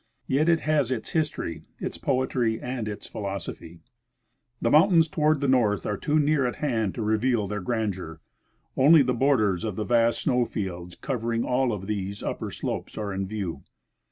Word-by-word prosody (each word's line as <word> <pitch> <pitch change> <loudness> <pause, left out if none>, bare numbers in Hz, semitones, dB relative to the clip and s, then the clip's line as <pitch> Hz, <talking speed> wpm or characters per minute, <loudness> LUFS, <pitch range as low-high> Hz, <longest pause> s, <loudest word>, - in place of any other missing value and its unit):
Yet 150 +5 +2
it 165 -1 +3
has 145 -5 +1
its 120 -4 -3
history, 150 - -2 0.2
its - - -5
poetry, 125 -4 0
and 125 -3 -4
its 105 -1 -6
philosophy! 95 -4 -6 0.8
The - - +1
mountains 165 +1 +6
toward 155 -3 +1
the 140 - +1
north 110 -8 +2
are 105 - -1
too 150 +9 0
near 145 -3 +2
at 120 - -3
hand 115 -9 -1
to 115 - -3
reveal 110 0 +1
their 105 0 -3
grandeur; 95 -7 -3 0.6
only 150 +3 +7
the 125 0 0
borders 115 -8 +2
of 110 -4 -3
the 105 - -3
vast 115 -1 +2
snow 125 -1 +2
fields 90 -5 -5
cover 120 -4 -3
ing 115 0 0
all 125 0 +1
of 100 -3 -4
these 100 -1 -4
upper - - -3
slopes - - -5
are 105 -2 -3
in 95 0 -2
view. 95 -8 -4
115 Hz, 180 wpm, -26 LUFS, 100-135 Hz, 0.8 s, only